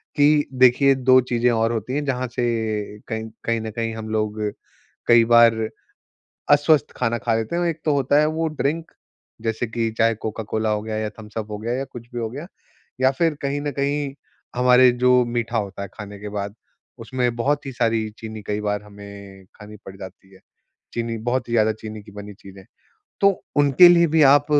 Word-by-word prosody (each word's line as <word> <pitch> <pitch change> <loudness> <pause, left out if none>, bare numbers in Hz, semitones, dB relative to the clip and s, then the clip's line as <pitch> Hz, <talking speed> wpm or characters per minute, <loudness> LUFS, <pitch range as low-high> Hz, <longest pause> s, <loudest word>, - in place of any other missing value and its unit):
कि 145 0 +4
देखिए 135 +2 +5
दो 130 0 +5
चीज़ें 120 -1 0
और 115 0 +1
होती 115 +3 -4
हैं 145 0 -1
जहाँ 130 -2 -1
से 125 - 0 0.6
कहीं 110 0 -4 0.2
कहीं 115 0 0
न 110 - -5
कहीं 115 +1 -3
हम 110 -1 -7
लोग 110 0 -2 0.7
कई 120 -1 +6
बार 115 0 +6 1.0
अस्वस्थ 145 0 +4
खाना 120 -2 0
खा 115 -2 +2
लेते 110 +7 -2
हैं। 175 - 0
एक 165 -1 -5
तो 150 - +2
होता 140 +1 +2
है 150 - +4
वो 165 - 0
ड्रिंक 160 +4 -2 0.5
जैसे 115 +1 -2
कि 115 0 -2
चाहे 115 0 +3
कोका-कोला 110 0 -2
हो 105 0 -1
गया 110 0 -4
या 110 0 -2
थम्स-अप 110 0 -7
हो 105 - -4
गया 115 +3 -3
या 135 +1 -3
कुछ 120 -1 -10
भी 120 - -3
हो 115 -1 -3
गया, 145 +7 -7 0.5
या 130 0 +5
फिर 160 +3 0
कहीं 140 +1 -2
न 145 0 -3
कहीं 140 +1 -2 0.4
हमारे 125 0 +5
जो 125 +1 +3
मीठा 120 -1 -2
होता 100 -2 -4
है, 100 - -7
खाने 105 -1 -9
के 105 +1 -7
बाद। 100 0 -5 0.4
उसमें 125 +1 -2
बहुत 145 +5 0
ही - - -4
सारी 115 -2 0
चीनी 110 -1 -7
कई 105 0 -2
बार 105 0 -2
हमें 100 -2 -12
खानी 105 0 -12
पड़ 95 - -10
जाती 95 0 -12
है। - - -18 0.5
चीनी 115 -1 -3
बहुत 125 0 -1
ही - - -3
ज़्यादा 110 -1 +3
चीनी 110 0 -9
की 105 - -14
बनी 105 0 -9
चीज़ें। 95 0 -14 0.6
तो 200 - +7 0.3
उनके 145 +5 +7
लिए 170 -1 +5
भी 160 0 +2
आप 145 +1 +6
115 Hz, 200 wpm, -22 LUFS, 110-135 Hz, 1.0 s, तो